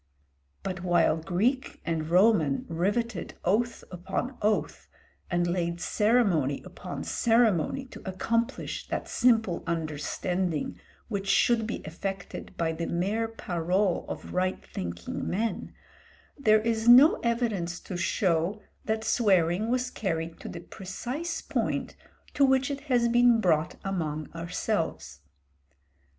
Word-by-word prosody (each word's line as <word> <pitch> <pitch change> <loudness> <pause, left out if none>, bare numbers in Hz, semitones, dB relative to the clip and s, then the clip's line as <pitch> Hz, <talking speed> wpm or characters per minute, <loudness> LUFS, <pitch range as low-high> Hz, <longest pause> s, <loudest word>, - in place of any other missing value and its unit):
But 185 -2 -4
while 175 -3 +3
Greek 195 - -1
and 160 -1 -2
Roman 175 -6 +4
riveted 200 +5 -1
oath 230 +6 +1
upon 190 +8 -3
oath 210 +1 0 0.4
and 175 -1 +1
laid 175 -1 -1
ceremony 195 - +2
upon - - -7
ceremony, 230 - +2
to - - -11
accomplish 230 +4 -2
that - - -3
simple 225 -7 +2
understanding 165 +1 -2 0.3
which 200 -3 -3
should 225 +2 +3
be 225 - -4
effected 195 +4 -6
by 165 -1 0
the 165 +1 -3
mere 200 +6 0
parole 185 -3 -1
of - - -6
right 185 +1 -1
thinking 85 -1 -5
men, 220 +5 -2 0.6
there 215 -6 +4
is 225 0 -1
no 255 +6 +8
evidence 220 -8 -1
to 185 - -7
show 175 +2 +1 0.3
that 220 0 -1
swearing 195 -2 +2
was 250 0 0
carried 165 -4 -3
to - - -7
the - - -7
precise 255 - -5
point - - -2 0.4
to 285 - +3
which 265 +1 +3
it 280 0 -4
has 240 -2 +3
been 240 0 +5
brought 160 -5 +2
among 155 -6 -3
ourselves. 170 - -3
195 Hz, 120 wpm, -28 LUFS, 170-230 Hz, 0.6 s, no